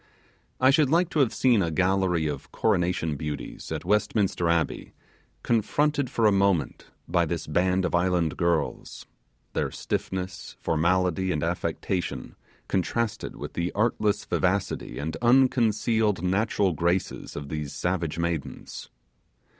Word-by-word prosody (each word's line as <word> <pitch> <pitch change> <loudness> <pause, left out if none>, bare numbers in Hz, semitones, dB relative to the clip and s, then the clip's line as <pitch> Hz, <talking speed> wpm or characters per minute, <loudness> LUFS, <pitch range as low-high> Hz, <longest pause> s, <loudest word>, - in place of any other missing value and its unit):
I 130 +1 +6
should 145 -1 +3
like 170 +3 +3
to 155 - 0
have 130 -5 +4
seen 120 -5 +3
a 85 - 0
gallery 90 -1 +1
of 75 -3 -4
coronation 85 -3 +1
beauties, 75 0 -6
at - - -4
Westminster 105 -3 +1
Abbey, 85 -1 -1 0.5
confronted 145 +4 +1
for 115 - +1
a 105 - +6
moment 100 -7 +1 0.2
by 85 +1 +2
this 85 0 -3
band 90 +4 +1
of 90 - -2
island 85 -2 +1
girls; 85 -2 -1 0.5
their - - 0
stiffness, 95 0 -4
formality, 90 +3 +1
and 75 -3 -1
affectation, 85 +1 -2 0.3
contrasted 105 +4 -1
with - - -7
the 85 +1 -2
artless 105 -1 +1
vivacity - - -1
and 80 +2 -3
unconcealed 115 -5 +3
natural 95 0 +1
graces 85 +4 -1
of 70 -1 -6
these 75 -2 -4
savage 85 -3 -2
maidens. 85 -3 -4
90 Hz, 130 wpm, -26 LUFS, 85-105 Hz, 0.5 s, I